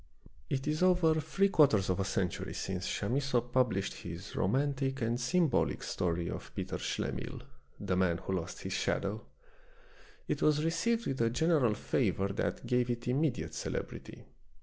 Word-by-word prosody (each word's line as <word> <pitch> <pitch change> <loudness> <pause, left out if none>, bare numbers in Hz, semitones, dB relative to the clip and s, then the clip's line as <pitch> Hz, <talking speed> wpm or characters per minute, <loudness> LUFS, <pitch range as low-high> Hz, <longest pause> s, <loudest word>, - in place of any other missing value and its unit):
It 135 0 -1
is 155 +2 0
over 175 -4 +4
three 195 +6 +2
quarters 130 - +4
of 90 - -1
a - - +2
century 90 -2 -2
since 90 -1 -3
Chamisso 130 +4 +1
published 120 -5 0
his 85 +4 -8
romantic 135 +5 0
and 120 +2 0
symbolic 160 +2 +2
story 85 -1 -1
of - - -6
Peter - - -3
Schlemihl, - - -3 0.4
the 95 -2 -1
man 90 -2 +2
who 95 - -4
lost 90 -3 -4
his - - -3
shadow. 100 +2 -1 1.0
It - - -1
was 150 0 +3
received 225 +8 +1
with 135 -2 -1
a 115 - +3
general 140 -4 +2
favor 100 -1 0
that 100 - -2
gave 125 -1 +1
it 120 0 -3
immediate 140 +2 0
celebrity. - - -5
125 Hz, 150 wpm, -32 LUFS, 95-150 Hz, 1.0 s, over